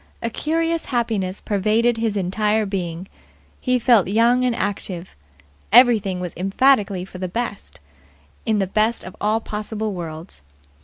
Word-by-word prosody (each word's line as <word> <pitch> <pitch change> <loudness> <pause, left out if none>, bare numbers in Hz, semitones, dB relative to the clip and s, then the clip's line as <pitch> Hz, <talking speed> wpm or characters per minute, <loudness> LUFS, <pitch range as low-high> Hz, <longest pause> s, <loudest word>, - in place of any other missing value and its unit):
A 230 - -1
curious 330 +4 -1
happiness 220 -7 -2
pervaded 220 +4 +1
his 225 -2 -1
entire 210 +3 0
being. 180 -2 -4 0.5
He 255 -1 +1
felt 235 -6 +4
young 235 +5 +3
and 250 -2 +1
active. 190 -4 -3 0.6
Everything 220 -6 +5
was 180 -1 -5
emphatically 195 -1 +2
for 185 -1 -11
the 185 - -2
best 210 +2 -5 0.6
in 220 - +1
this 195 -2 0
best 220 +3 +1
of 185 - -9
all 215 +2 +2
possible 215 0 -4
worlds. 165 - -8
210 Hz, 140 wpm, -21 LUFS, 190-235 Hz, 0.6 s, Everything